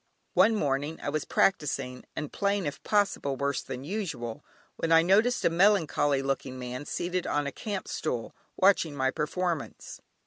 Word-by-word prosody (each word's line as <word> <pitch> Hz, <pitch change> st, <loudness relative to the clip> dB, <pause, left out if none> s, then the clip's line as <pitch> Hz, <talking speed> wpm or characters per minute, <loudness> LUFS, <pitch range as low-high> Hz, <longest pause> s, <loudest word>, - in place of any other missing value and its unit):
One 205 Hz, +5 st, +5 dB
morning 145 Hz, -3 st, -1 dB
I -, -, -3 dB
was 155 Hz, +1 st, -2 dB
practising, 140 Hz, -8 st, 0 dB
and 150 Hz, -, -5 dB
playing, 200 Hz, -2 st, 0 dB
if 145 Hz, -, -4 dB
possible, 200 Hz, -9 st, +1 dB
worse 140 Hz, +1 st, -1 dB
than 130 Hz, -1 st, -7 dB
usual, 150 Hz, -, -4 dB, 0.3 s
when 165 Hz, -, -1 dB
I 165 Hz, 0 st, +7 dB
noticed 215 Hz, +7 st, +3 dB
a -, -, +6 dB
melancholy 165 Hz, -7 st, +3 dB
looking 135 Hz, -1 st, -2 dB
man, 125 Hz, +2 st, -6 dB
seated 180 Hz, +1 st, -2 dB
on 145 Hz, 0 st, 0 dB
a 140 Hz, -, -2 dB
camp 200 Hz, +5 st, -5 dB
stool, 120 Hz, -7 st, -3 dB, 0.2 s
watching 185 Hz, -6 st, +3 dB
my 130 Hz, -1 st, +1 dB
performance. 165 Hz, +1 st, -3 dB
155 Hz, 160 wpm, -28 LUFS, 135-190 Hz, 0.3 s, I